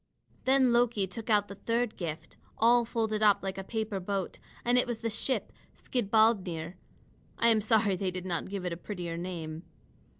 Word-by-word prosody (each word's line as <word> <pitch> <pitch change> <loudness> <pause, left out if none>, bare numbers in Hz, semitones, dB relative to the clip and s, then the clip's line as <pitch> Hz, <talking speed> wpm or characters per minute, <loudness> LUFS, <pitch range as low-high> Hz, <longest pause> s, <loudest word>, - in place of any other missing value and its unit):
Then 260 -2 +4
Loki 235 -4 +3
took 215 +5 -7
out 205 -2 +3
the - - -8
third 230 +3 -1
gift, 160 -3 -6 0.2
all 235 +1 +5
folded 220 -2 -1
up 210 -2 +4
like 195 0 -3
a - - -4
paper 215 -1 -3
boat; 195 0 -3 0.3
and 245 +1 +4
it 250 - +2
was 240 -2 -2
the 230 0 -3
ship 255 +4 -1 0.2
Skidbladnir, 200 -8 +1 0.6
I 235 - +4
am 220 -2 +4
sorry 215 -2 +3
they 185 +1 -1
did 185 0 -5
not 175 0 -2
give 195 -2 -4
it 175 - -1
a - - -5
prettier 175 -3 -5
name. 165 -2 -5
205 Hz, 185 wpm, -30 LUFS, 185-230 Hz, 0.6 s, all